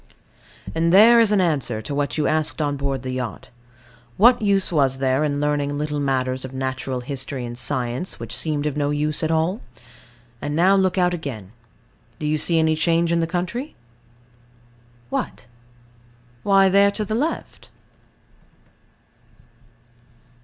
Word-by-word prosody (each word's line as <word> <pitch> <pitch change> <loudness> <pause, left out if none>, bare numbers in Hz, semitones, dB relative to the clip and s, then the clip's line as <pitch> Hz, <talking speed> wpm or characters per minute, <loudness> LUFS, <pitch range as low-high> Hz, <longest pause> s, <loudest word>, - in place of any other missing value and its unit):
And 165 +1 +1
there 225 +5 +7
is 225 -2 +4
an 205 - +3
answer 145 -10 0
to 110 +6 -6
what 140 -2 -2
you 150 - 0
asked 155 0 0
on 145 -2 0
board 135 -2 -3
the 130 - -4
yacht 125 -3 -5 0.7
What 240 +4 +5
use 200 -3 +1
was 135 -5 +2
there 130 +2 +1
in 145 -1 -1
learning 145 -1 -1
little 150 0 -2
matters 130 -2 -1
of 130 0 -8
natural 130 -1 -3
history 135 0 -4
and 120 0 -7
science, 125 +5 -2
which - - -5
seemed 150 -2 -1
of 150 -2 -2
no 145 -1 0
use 150 +1 0
at 160 - -1
all? 165 +6 0 0.8
And 145 - -3
now, 185 +4 +4
look 190 -1 +1
out 180 -1 +2
again. 125 - -6 0.7
Do 150 - -5
you 155 0 0
see 165 +2 +3
any 160 0 +2
change 170 +1 +1
in 170 - +2
the 165 - 0
country? 185 - -4 1.4
What? - - -4 1.0
Why, 195 -1 +4
there 200 +1 +5
to 210 +1 -3
the 215 - -4
left. 290 +9 -3
150 Hz, 155 wpm, -22 LUFS, 135-180 Hz, 1.4 s, there